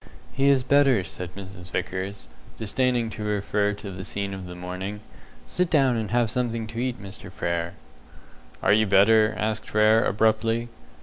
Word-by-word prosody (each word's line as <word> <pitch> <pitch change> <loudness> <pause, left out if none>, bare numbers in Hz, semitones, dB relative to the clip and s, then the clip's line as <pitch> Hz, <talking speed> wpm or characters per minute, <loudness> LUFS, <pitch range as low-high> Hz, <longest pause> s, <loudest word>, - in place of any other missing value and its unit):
"He 135 +1 +2
is 135 -2 +4
better," 135 -5 +4
said 90 0 -8
Mrs. 95 -2 -9
Vickers, 95 -5 -4 0.3
disdaining 120 +1 0
to 110 - -6
refer 105 0 0
to 100 -1 -8
the 95 0 -7
scene 100 0 -3
of 95 -1 -7
the 90 - -8
morning. 90 +3 -5 0.4
"Sit 180 - -1
down 135 -6 +3
and 110 -3 -2
have 120 0 +1
something 120 -3 -1
to 115 +1 -6
eat, 125 0 -2
Mr. 95 -1 -10
Frere." 85 -2 -2 0.9
"Are - - +5
you 110 0 +3
better?" 110 +2 +5
asked 105 0 -2
Frere, 110 +1 +4
abruptly. 110 +3 +1
105 Hz, 165 wpm, -25 LUFS, 95-115 Hz, 0.9 s, Are